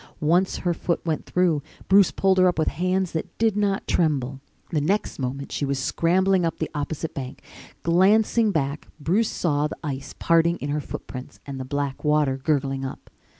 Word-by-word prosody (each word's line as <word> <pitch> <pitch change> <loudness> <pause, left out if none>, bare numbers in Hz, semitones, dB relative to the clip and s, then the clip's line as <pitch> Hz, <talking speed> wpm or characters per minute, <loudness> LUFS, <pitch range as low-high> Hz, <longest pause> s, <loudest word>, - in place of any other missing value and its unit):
Once 175 +5 +2
her 175 - +3
foot 170 +1 -1
went 160 -2 -2
through, 175 -5 +2 0.3
Bruce 195 0 +6
pulled 190 -1 +2
her 185 - +6
up 180 - +1
with 155 - +2
hands 185 +3 0
that 165 +2 -5
did 225 -2 +2
not 200 -2 0
tremble. 135 -5 0 0.3
The 155 - +1
next 195 +4 -1
moment 135 +2 -4
she - - -2
was 140 -1 0
scrambling 185 +6 +2
up 165 - -1
the 160 - -3
opposite 150 +2 -3
bank. 135 -1 -7 0.4
Glancing 210 +6 +4
back, 145 -5 -2
Bruce 195 +9 +1
saw 150 -3 0
the - - -8
ice 140 -2 -5
parting 170 +1 +3
in 145 - -5
her 150 +1 -1
footprints 130 -2 -8
and 135 -1 -6
the 130 - -4
black 140 0 -3
water 150 -3 +2
gurgling 135 -1 0
up. 130 - -7
160 Hz, 185 wpm, -24 LUFS, 140-185 Hz, 0.4 s, Bruce